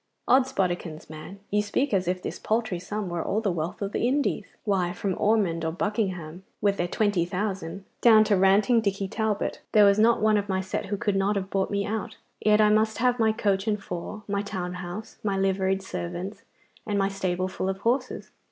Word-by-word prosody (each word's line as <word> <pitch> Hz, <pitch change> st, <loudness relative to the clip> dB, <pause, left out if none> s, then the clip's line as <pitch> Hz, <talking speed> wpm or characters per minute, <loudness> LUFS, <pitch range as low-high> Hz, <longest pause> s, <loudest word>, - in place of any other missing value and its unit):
'Od's 265 Hz, 0 st, +4 dB
bodikins, 175 Hz, -, -2 dB
man, 155 Hz, +6 st, -9 dB
you 210 Hz, +1 st, +3 dB
speak 255 Hz, +5 st, -1 dB
as 185 Hz, -2 st, +1 dB
if 180 Hz, 0 st, -1 dB
this -, -, -5 dB
paltry 220 Hz, -5 st, -1 dB
sum 205 Hz, +3 st, -4 dB
were 175 Hz, -1 st, -2 dB
all 210 Hz, -, 0 dB
the 210 Hz, -3 st, 0 dB
wealth 170 Hz, +3 st, -3 dB
of 200 Hz, -, -3 dB
the 235 Hz, -, 0 dB
Indies. 270 Hz, -5 st, 0 dB, 0.2 s
Why, 185 Hz, -4 st, +1 dB
from 190 Hz, +1 st, -2 dB
Ormonde 195 Hz, -6 st, +1 dB
or 160 Hz, -, 0 dB
Buckingham, 185 Hz, -3 st, -2 dB, 0.2 s
with 200 Hz, -1 st, +1 dB
their 175 Hz, -, 0 dB
twenty 205 Hz, -2 st, +1 dB
thousand, 190 Hz, 0 st, -4 dB, 0.2 s
down 220 Hz, -2 st, +7 dB
to 210 Hz, -1 st, +2 dB
ranting 200 Hz, +5 st, +4 dB
Dicky 195 Hz, -2 st, -1 dB
Talbot, 215 Hz, 0 st, -2 dB
there 210 Hz, -1 st, +7 dB
was 200 Hz, +1 st, +4 dB
not 230 Hz, +2 st, +5 dB
one 215 Hz, 0 st, +3 dB
of 205 Hz, 0 st, -2 dB
my 190 Hz, 0 st, +1 dB
set 190 Hz, +1 st, -3 dB
who 205 Hz, +1 st, -2 dB
could 205 Hz, 0 st, 0 dB
not 195 Hz, +2 st, +1 dB
have 195 Hz, -1 st, -3 dB
bought 195 Hz, -1 st, 0 dB
me 200 Hz, -1 st, -1 dB
out. 220 Hz, 0 st, -4 dB, 0.3 s
Yet 210 Hz, 0 st, +5 dB
I 210 Hz, -1 st, +5 dB
must 220 Hz, +1 st, +2 dB
have 250 Hz, 0 st, +2 dB
my 220 Hz, -1 st, +4 dB
coach 205 Hz, -2 st, 0 dB
and 210 Hz, -1 st, +1 dB
four, 195 Hz, +3 st, -6 dB
my 200 Hz, -1 st, 0 dB
town 185 Hz, -3 st, -4 dB
house, 180 Hz, +4 st, -7 dB
my 200 Hz, -2 st, 0 dB
liveried 195 Hz, 0 st, +1 dB
servants, 185 Hz, -, -5 dB, 0.5 s
and 205 Hz, -1 st, 0 dB
my 195 Hz, -1 st, +2 dB
stable 185 Hz, -2 st, -1 dB
full 185 Hz, 0 st, -3 dB
of 190 Hz, -, -2 dB
horses. 250 Hz, +3 st, -1 dB
200 Hz, 210 wpm, -26 LUFS, 185-215 Hz, 0.5 s, down